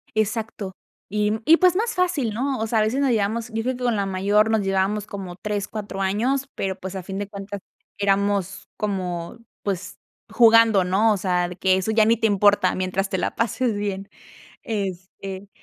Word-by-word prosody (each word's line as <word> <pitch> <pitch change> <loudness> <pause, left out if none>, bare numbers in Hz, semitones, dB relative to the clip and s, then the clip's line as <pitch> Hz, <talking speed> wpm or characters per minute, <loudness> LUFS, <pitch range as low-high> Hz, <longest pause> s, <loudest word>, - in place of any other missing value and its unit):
Exacto. 220 -2 -2 0.4
Y 210 +1 +1
y 330 +1 +7
pues 365 -1 +4
más 445 +2 0
fácil, 330 - 0
¿no? 260 +2 -1
O 220 - -1
sea, 220 -1 +2
veces 225 +6 +1
nos 275 -2 +2
llevamos, 225 +1 0
yo 225 0 -1
creo 255 +1 -1
que 250 - -7
con 240 -2 +2
la 200 -1 0
mayor 200 +3 +2
nos 220 -1 +2
llevábamos 195 +2 0
como 190 -4 -7
3, 205 +1 -3
4 205 -2 -5
años, 250 +8 0
pero 190 0 -2
pues 190 +1 -6
a 185 - -5
fin 195 +1 -6
de 205 - -3
cuentas 200 0 -7 0.4
éramos 200 -1 0
como 185 -2 -3 0.3
pues 190 -2 -4 0.3
jugando, 225 -3 +6
¿no? 205 +5 +3
O - - -1
sea, 180 -1 0
que 190 0 +3
eso 190 +4 -1
ya 220 -1 +4
ni 230 +1 +4
te 225 -1 +2
importa 205 -2 +3
mientras 185 +1 -1
te 190 - -1
la - - -2
pases 230 0 0
bien. 200 -1 -3 0.5
Este, 195 -1 -5
205 Hz, 190 wpm, -23 LUFS, 195-225 Hz, 0.5 s, y